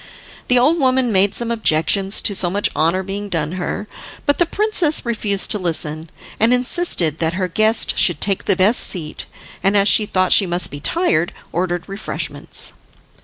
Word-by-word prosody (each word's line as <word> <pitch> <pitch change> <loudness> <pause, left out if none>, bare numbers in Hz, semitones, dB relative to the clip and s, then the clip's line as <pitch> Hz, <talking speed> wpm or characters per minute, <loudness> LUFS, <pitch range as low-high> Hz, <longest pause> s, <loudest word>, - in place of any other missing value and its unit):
The 250 - +3
old 295 +8 +3
woman 255 -3 +2
made 195 0 +2
some 235 -1 -3
objections 195 -1 +1
to 205 - +1
so 180 -2 0
much 200 +3 +1
honour 170 +4 +1
being 200 +2 -6
done 160 -4 -2
her, 185 +3 -5 0.4
but 285 - +1
the 345 - +2
princess 380 -8 0
refused 210 -4 0
to 210 - +1
listen, 160 -2 -3 0.3
and 225 +2 +3
insisted 250 - 0
that 160 0 -1
her 185 -1 -1
guest 215 +5 +2
should 175 -8 +4
take 195 -2 -1
the 200 - +2
best 195 +6 +3
seat, 160 -5 -2 0.3
and 200 +1 +2
as 200 0 +3
she 210 0 +4
thought 185 -2 +1
she 195 - +5
must 175 +1 0
be 145 - -7
tired 175 - 0 0.2
ordered 175 0 -3
refreshments. 195 +2 -3
195 Hz, 175 wpm, -18 LUFS, 175-235 Hz, 0.4 s, she